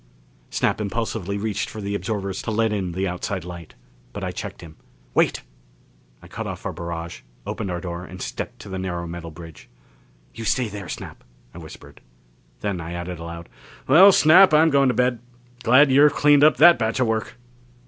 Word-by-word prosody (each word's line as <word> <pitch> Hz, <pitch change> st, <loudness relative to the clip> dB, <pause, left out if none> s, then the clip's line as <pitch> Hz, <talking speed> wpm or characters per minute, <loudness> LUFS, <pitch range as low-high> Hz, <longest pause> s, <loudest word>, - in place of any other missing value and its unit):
Snap -, -, 0 dB
impulsively 105 Hz, -2 st, -3 dB
reached 105 Hz, 0 st, -3 dB
for 110 Hz, -, -8 dB
the 100 Hz, -1 st, -4 dB
absorbers 100 Hz, -2 st, -3 dB
to -, -, -5 dB
let 110 Hz, 0 st, +1 dB
in 95 Hz, -4 st, -3 dB
the 95 Hz, +2 st, -2 dB
outside 90 Hz, 0 st, -4 dB
light. 85 Hz, -2 st, -10 dB, 0.4 s
But -, -, -6 dB
I -, -, -2 dB
checked -, -, -7 dB
him. 80 Hz, -2 st, -12 dB, 0.4 s
"Wait!" -, -, +1 dB, 0.8 s
I -, -, -12 dB
cut -, -, -6 dB
off -, -, -7 dB
our -, -, -3 dB
barrage, 85 Hz, 0 st, -6 dB, 0.2 s
opened 95 Hz, -, -4 dB
our 90 Hz, -1 st, -3 dB
door 85 Hz, -1 st, -6 dB
and 90 Hz, +1 st, -11 dB
stepped -, -, -6 dB
to -, -, -11 dB
the 95 Hz, 0 st, -5 dB
narrow 90 Hz, -2 st, -4 dB
metal 85 Hz, 0 st, -7 dB
bridge. 80 Hz, 0 st, -13 dB, 0.6 s
"You 115 Hz, -, -8 dB
stay 120 Hz, +1 st, 0 dB
there, 100 Hz, -4 st, -8 dB
Snap!" -, -, -8 dB, 0.3 s
I 85 Hz, -, -10 dB
whispered. 80 Hz, -2 st, -13 dB, 0.6 s
Then 100 Hz, -4 st, -3 dB
I 85 Hz, +1 st, -7 dB
added 85 Hz, 0 st, -6 dB
aloud, 85 Hz, 0 st, -8 dB, 0.4 s
"Well, 180 Hz, +9 st, +8 dB
Snap, 175 Hz, 0 st, +6 dB
I'm 160 Hz, +1 st, +5 dB
going 140 Hz, -1 st, +4 dB
to 125 Hz, -, 0 dB
bed. 125 Hz, -1 st, +1 dB, 0.4 s
Glad 130 Hz, +4 st, +5 dB
you've 145 Hz, +2 st, +5 dB
cleaned 145 Hz, -1 st, +5 dB
up 155 Hz, -2 st, +5 dB
that 170 Hz, -1 st, +7 dB
batch 110 Hz, +2 st, -1 dB
of 130 Hz, -, +3 dB
work." 110 Hz, +1 st, -2 dB
100 Hz, 190 wpm, -22 LUFS, 85-125 Hz, 0.8 s, Well